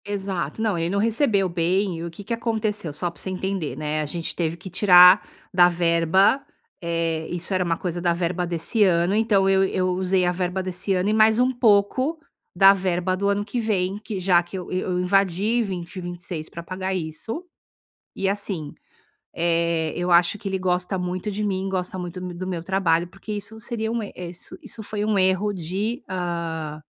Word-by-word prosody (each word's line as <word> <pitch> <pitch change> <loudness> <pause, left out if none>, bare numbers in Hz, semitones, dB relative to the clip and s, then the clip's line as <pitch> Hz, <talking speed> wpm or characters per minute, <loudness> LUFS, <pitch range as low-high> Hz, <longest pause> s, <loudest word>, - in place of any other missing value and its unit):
Exato. 195 -4 -3
Não, 215 -5 +1
ele 165 0 -1
não 200 - -1
recebeu 220 -3 +2
bem 180 +2 0
e - - -5
o 170 - -4
que 170 +5 -11
que 215 - -3
aconteceu? 220 -6 -2
Só 165 +5 -3
pra - - -15
você - - -4
entender, 190 -3 -3
né, 155 0 -2
a - - -2
gente 165 +3 -5
teve 170 -1 -1
que 190 +3 -9
tirar 180 0 +7 0.3
da 175 -1 +6
verba, 175 - +3 0.4
eh, 165 -2 -1
isso 175 +2 -3
era 185 -1 +2
uma 170 -2 0
coisa 175 -1 -3
da 175 -1 +2
verba 175 +1 -1
desse 175 +6 +1
ano, 175 -1 +3
então, 210 -3 +3
eu 195 0 +4
eu 185 -1 0
usei 185 0 +1
a 175 - +2
verba 180 +1 -2
desse 185 +1 -1
ano 185 +2 +1
e - - +2
mais 220 0 +5
um 250 +1 +3
pouco 245 +6 +2 0.4
da 195 0 +8
verba 185 -1 0
do 200 +2 0
ano 200 0 0
que 225 +4 -3
vem, 200 -4 0
que 210 -2 -5
já 180 -1 +4
que 175 +2 -8
eu 180 - -7
eu 185 0 -1
invadi 195 +4 +2
20, 185 -2 -5
26 175 -2 -5
pra 170 - -8
pagar 185 +2 -3
isso 185 - -5 0.7
e, 195 - -1
assim, 195 -7 -2 0.6
eh, 165 -1 +1
eu 175 +1 -1
acho 175 +3 +4
que 200 - -5
ele 190 0 -1
gosta 180 0 -1
muito 180 +2 -3
de 210 +1 -3
mim, 195 -1 -1
gosta 185 -1 -3
muito 180 0 -6
mo 180 -1 -6
do 185 +2 -5
meu 180 -3 -3
trabalho, 175 -3 +1
porque 195 +4 -12
isso 210 +2 -6
seria 220 -1 -3
um 235 -1 -1
er 205 - -7
eh, 175 -1 -6
isso 180 - -7
isso 235 -4 -8
foi 210 0 -3
um 215 -1 +1
erro 190 +2 +2
de, 200 - -3
ah 165 -4 -3
185 Hz, 205 wpm, -23 LUFS, 175-205 Hz, 0.7 s, da